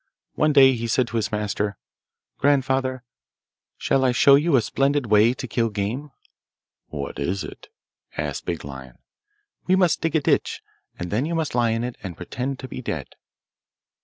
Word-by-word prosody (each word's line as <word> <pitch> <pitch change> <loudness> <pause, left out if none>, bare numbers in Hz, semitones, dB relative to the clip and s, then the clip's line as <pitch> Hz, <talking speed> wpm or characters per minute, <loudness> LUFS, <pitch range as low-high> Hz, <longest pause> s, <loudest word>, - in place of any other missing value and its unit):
One 155 0 +2
day 135 -2 +7
he 115 -1 -3
said 125 +2 +1
to 115 - -2
his 110 -1 -1
master, 105 -1 -2 0.6
'Grandfather, 130 -2 +1 0.7
shall 135 - +1
I 130 - +4
show 140 +3 +6
you 150 +2 +4
a 125 - +5
splendid 140 +5 +1
way 110 +3 +4
to 130 - -6
kill 115 0 0
game?' 110 +8 -3 0.8
'What 70 -2 -6
is 90 +7 -1
it?' - - -10 0.5
asked - - -4
Big 85 -4 -3
Lion. 65 -3 -10 0.7
'We 185 - +4
must 180 -3 +2
dig 165 -1 -1
a - - +5
ditch, - - 0 0.3
and 90 0 -5
then 120 +8 0
you 170 - -2
must 160 -2 -1
lie 120 -1 +2
in 115 +1 -1
it 125 0 -5
and 90 -4 -7
pretend 125 +9 -4
to 130 - -8
be 130 - -7
dead. 80 - -4
125 Hz, 175 wpm, -23 LUFS, 105-140 Hz, 0.8 s, day